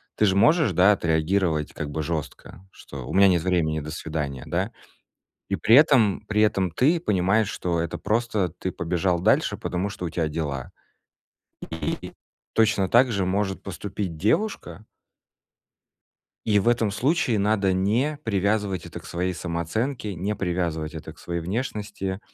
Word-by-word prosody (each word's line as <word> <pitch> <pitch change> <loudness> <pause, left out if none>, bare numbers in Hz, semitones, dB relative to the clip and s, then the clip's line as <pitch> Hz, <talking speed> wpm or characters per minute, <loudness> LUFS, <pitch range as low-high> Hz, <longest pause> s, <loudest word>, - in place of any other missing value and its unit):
Ты 110 - +3
же 95 -2 +2
можешь, 115 - +4
да, 90 +4 +6
отреагировать 80 -2 +1
как 75 - -5
бы 80 +2 -3
жёстко, 80 +3 -6
что: 65 -6 -10
"У - - -5
меня 100 +1 +6
нет 85 -3 +2
времени, 85 -4 +1
до 75 +1 -7
свидания", 75 -4 -4
да? - - -2 0.8
И - - 0
при 115 - +5
этом, 130 - +5
при 105 0 +1
этом 95 -4 +2
ты 145 - +2
понимаешь, 105 - +1
что 85 -4 -2
это 85 - -4
просто 110 -3 0
ты 90 +3 -5
побежал 85 +1 0
дальше, 90 - +2
потому 90 +3 -2
что 90 - -6
у - - -2
тя 80 -1 -1
дела. 75 -5 -4 1.1
И - - -3 0.4
точно 110 -4 +3
так 120 +3 +5
же 100 -3 0
может 95 +1 -1
поступить 95 -2 -5
девушка 110 - -1 1.6
и 105 -2 +3
в 100 - -2
этом 115 -3 +2
случае 130 - +1
надо 100 -2 +2
не 115 +11 +1
привязывать 100 -3 0
это - - -8
к - - -16
своей 90 +2 -2
самооценке, 95 - -3
не 100 +5 -2
привязывать 85 -5 -2
это 80 0 -8
к 75 - -21
своей 85 -1 -4
внешности. 100 -1 -3
95 Hz, 155 wpm, -24 LUFS, 85-105 Hz, 1.6 s, да